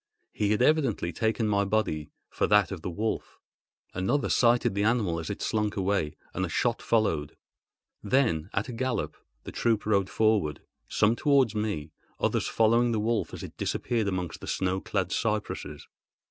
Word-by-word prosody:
He 105 - 0
had 105 +3 +2
evidently 130 - +2
taken 110 +3 0
my 100 -1 +2
body 100 -8 -1 0.2
for - - 0
that 105 -1 +4
of 95 -4 -5
the 90 - -4
wolf. 105 +6 -3 0.5
Another 95 +11 0
sighted 120 -4 +3
the 100 - -1
animal 105 -7 +1
as 80 - -5
it - - -4
slunk 105 -1 -1
away, 95 -5 0 0.2
and 95 - -2
a 95 - -2
shot 120 +7 0
followed. 80 -11 0 0.6
Then, 105 - +1
at 100 - -1
a 125 - -6
gallop, 130 +1 -2 0.3
the - - -7
troop 115 -3 0
rode 100 -3 +2
forward—some 105 +1 0
towards 140 -7 +3
me, 105 -9 -2 0.3
others - - 0
following 115 +2 +3
the 110 - 0
wolf 110 +1 0
as - - -7
it - - -9
disappeared 115 -4 -1
amongst 90 -3 -3
the - - -8
snow 95 0 -1
clad 95 -2 -2
cypresses. 105 -10 -2
105 Hz, 165 wpm, -28 LUFS, 95-115 Hz, 0.6 s, that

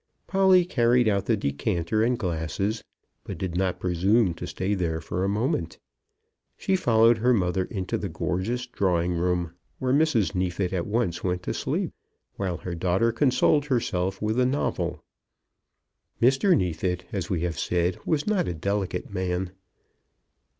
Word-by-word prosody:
Polly 190 -2 +4
carried 120 -6 +3
out 100 -2 +1
the 115 - +2
decanter 85 +5 -1
and 120 +2 +2
glasses, 90 +4 -2 0.4
but - - -6
did 90 -2 -4
not 90 -1 0
presume 95 +3 +2
to - - -7
stay 95 +2 -2
there 85 -4 -1
for 85 +3 -3
a 95 - +1
moment. 100 - -1 0.8
She 190 - 0
followed 115 -8 +4
her 125 +2 +3
mother 90 -2 0
into 95 -2 -3
the 100 - -4
gorgeous 95 +9 -2
drawing 90 -7 0
room, 85 -1 -1 0.2
where 130 0 0
Mrs. 140 -10 +2
Neefit 90 0 -1
at 90 -2 -1
once 105 -5 -1
went 90 -1 -1
to - - -2
sleep, - - -2 0.4
while 95 -3 -2
her 90 +1 -6
daughter 95 +6 +1
consoled 135 +4 +3
herself 95 -8 -1
with 110 +3 0
a 125 - +4
novel. 140 +3 -2 1.2
Mr. 135 - +4
Neefit, 90 -1 -1
as 95 -7 -3
we 90 -4 -1
have 85 -1 -2
said, 90 +1 0
was 150 -3 0
not 210 -3 +1
a 90 - -2
delicate 100 +3 -2
man. 90 -1 -2
95 Hz, 155 wpm, -26 LUFS, 90-120 Hz, 1.2 s, Polly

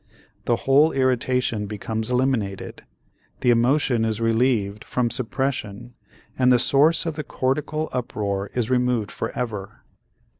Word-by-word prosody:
The 120 - +2
whole 145 +4 +5
irritation 125 -4 0
becomes 110 +2 -3
eliminated, 125 -6 -1 0.6
the 125 - +4
emotion 120 0 +2
is 110 -1 -1
relieved 115 -3 +1
from 120 -2 -1
suppression 125 -3 -3 0.5
and 130 0 +5
the 125 - +6
source 145 +8 +3
of 160 -2 -3
the 150 - -3
cortical 150 +4 -2
uproar 100 -5 -2
is 120 -1 -1
removed 125 -4 +1
forever. 105 -6 -5
125 Hz, 120 wpm, -23 LUFS, 110-130 Hz, 0.6 s, the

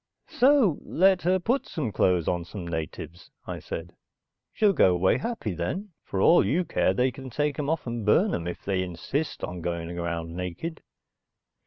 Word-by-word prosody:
"So 255 - +4
let 190 +1 +3
her 180 +4 +3
put 235 +9 0
some 140 - -3
clothes 90 -3 +2
on 85 -1 0
some 90 +1 -7
natives," 80 0 -6 0.2
I - - -5
said. 85 +1 -7 0.6
"She'll 210 -2 +3
go 90 - +4
away 90 +2 +2
happy 230 - -3
and 85 - -7
then, 185 - -3 0.2
for 95 - -3
all 170 - +6
you 175 +5 +1
care, 155 - +2
they 125 +3 +2
can 130 +2 -9
take 145 +3 -1
'em 145 -1 -1
off 160 0 -1
and 120 -2 -3
burn 175 - +3
'em 85 - -2
if 90 - -6
they 95 -2 0
insist 95 - -3
on 90 -1 -4
going 85 0 -3
around 85 -1 -3
naked. 90 - -5
110 Hz, 185 wpm, -26 LUFS, -, 0.6 s, all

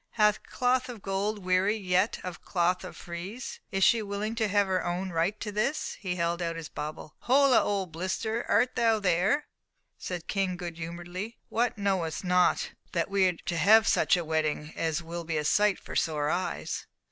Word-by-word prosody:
Hath 210 -1 +3
cloth 255 0 0
of 230 -5 -8
gold 200 +1 -2
wearied 190 +3 +2
yet 185 +4 +2
of 180 -1 -6
cloth 180 0 0
of 185 - -8
frieze? 185 +9 -7
Is 195 -1 +1
she 230 +2 +5
willing 205 +1 -3
to 230 -1 0
own 190 -2 +1
her - - -8
right 175 +6 +1
to 210 - -3
this?" 215 +9 -1
as - - -7
he 185 -3 -2
held 170 0 -1
out 165 -1 -2
his 165 -2 -6
bauble. 150 0 -6
"Holla, 270 0 +5
old 195 -4 -1
Blister! 205 +7 -2
art 245 +5 +3
thou 225 -2 +3
there?" 195 - +2 0.5
said 180 -2 -4
the - - -32
King, 190 -3 -1
good 175 -2 -6
humouredly. 175 +6 -6
"What! 235 0 0
knowest 190 -5 -1
not 180 0 +2 0.2
that 170 +1 0
we 195 -1 +4
are 180 - +1
to 170 - -1
have 220 +7 +6
such - - +4
a 175 - -3
wedding 155 -1 -1
as 165 0 -1
will 170 +1 -5
be 160 -1 -2
a 150 - -1
sight 205 +4 +3
for - - -10
sore 150 -2 +1
eyes!" 185 +1 -3
185 Hz, 195 wpm, -28 LUFS, 170-210 Hz, 0.5 s, have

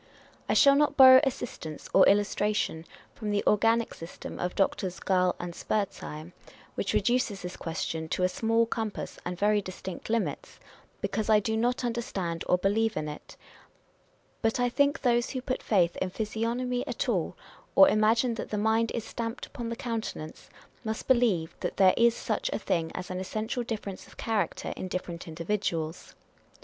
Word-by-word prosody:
I - - +2
shall 280 -1 +7
not 290 +1 +2
borrow 260 -1 +10
assistance 225 - -4
or 190 - +7
illustration 205 -4 +1 0.3
from 215 -2 -5
the 205 -1 +1
organic 225 +2 +3
system 165 +1 -9
of 180 0 -2
Doctors 190 -1 0
Gall 185 -2 +2
and 175 0 -5
Spurzheim, 180 -5 -3 0.4
which - - -2
reduces 240 -6 +1
this 180 0 -5
question 160 -1 -4
to 180 - -1
a - - +5
small 225 +4 +1
compass 225 -2 -4
and 180 0 -3
very 210 +2 +3
distinct 185 0 -7
limits, 230 0 -2 0.4
because 220 -1 -2
I 215 -1 +6
do 220 +2 -1
not 245 +3 0
understand 195 -8 -3
or 180 - +5
believe 215 +4 +1
in 155 - -2
it: 150 0 -9 1.0
but 225 +1 +1
I 245 0 +2
think 285 +5 +2
those 240 -2 +2
who 260 - -3
put 255 - -2
faith 175 -5 +2
in 185 - -1
physiognomy 230 +5 -2
at - - -2
all, - - -1 0.4
or 290 - +9
imagine 230 +1 +3
that 230 - -5
the 210 - -2
mind 220 +2 +2
is 230 - -2
stamped 230 +1 -5
upon 240 -4 -6
the 230 - -3
countenance, 225 -10 -5 0.3
must 220 -1 -4
believe 230 -11 +2
that - - -4
there 190 -1 +6
is 235 0 +4
such - - -2
a - - -1
thing 165 -2 -1
as 185 - -5
an 185 - -3
essential 215 +6 -3
difference 210 -5 -5
of - - -18
character 210 -7 -2
in 185 - -5
different 175 -2 -5
individuals. 165 -1 -3
215 Hz, 170 wpm, -28 LUFS, 180-235 Hz, 1.0 s, borrow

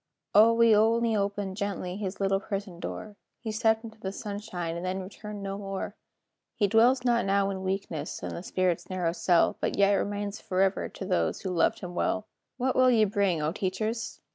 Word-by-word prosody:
"O, 220 +2 +7
we 230 -1 +5
only 225 +1 +3
opened 200 -1 -2
gently 200 -3 -3
His 195 -1 -4
little 195 0 +2
prison 195 -3 -5
door; 210 +3 -6 0.2
He 225 - -4
stepped 220 +1 +2
into 220 -1 -10
the 190 -2 -4
sunshine, 195 -5 -5
And 170 - -5
then 185 +1 -2
returned 205 +1 -8
no 195 0 -4
more. 195 -1 -5 0.6
He 205 - +2
dwells 240 +5 +4
not 240 -1 +3
now 195 0 +2
in 190 -1 -4
weakness, 190 -5 -3
In - - -3
the - - -5
spirit's 185 -2 -1
narrow 180 -3 0
cell, 175 0 +2
But - - -1
yet 200 0 +5
remains 205 +1 -2
forever 190 +1 +1
To 190 - -7
those 185 -1 0
who 190 - -3
loved 175 - +2
him 180 -1 -6
well." 215 +4 0 0.3
What 260 0 0
will 255 0 +5
ye 225 -3 +5
bring, 195 -5 +1
O 150 - +1
teachers! 215 +6 -3
200 Hz, 190 wpm, -28 LUFS, 190-220 Hz, 0.6 s, O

